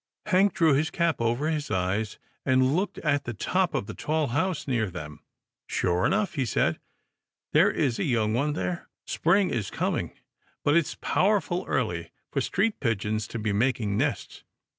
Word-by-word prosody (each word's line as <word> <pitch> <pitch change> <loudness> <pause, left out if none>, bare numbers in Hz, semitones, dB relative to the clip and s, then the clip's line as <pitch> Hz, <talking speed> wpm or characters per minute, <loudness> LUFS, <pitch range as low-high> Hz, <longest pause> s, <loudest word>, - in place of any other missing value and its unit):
Hank 195 -1 +3
drew 165 -5 +4
his 155 +4 +2
cap 170 -6 0
over 120 +6 +1
his 155 -2 -1
eyes, 95 +4 -1 0.3
and 130 +1 +3
looked 190 +4 -1
at 145 -3 0
the 120 - -4
top 180 - 0
of 135 - -1
the - - -7
tall 155 -2 -1
house 165 +6 -1
near 115 -6 0
them. 75 -4 -8 0.2
" - - -64
Sure 90 0 +1
enough," 205 +1 +1
he 140 -5 0
said, 80 -8 +1 0.3
" - - -52
there - - +6
is 125 -5 0
a - - +1
young 110 -5 +1
one 145 +5 +1
there. 170 +3 -3 0.2
Spring 185 +3 +2
is 105 -5 -2
coming, - - -2 0.5
but 145 - +3
it's 170 -3 +1
powerful 190 -2 +1
early - - -1 0.2
for - - 0
street 225 -1 0
pigeons 110 -2 -1
to - - -5
be 105 -2 -1
making 110 -2 +1
nests. 135 +1 -2
135 Hz, 180 wpm, -27 LUFS, 110-165 Hz, 0.5 s, there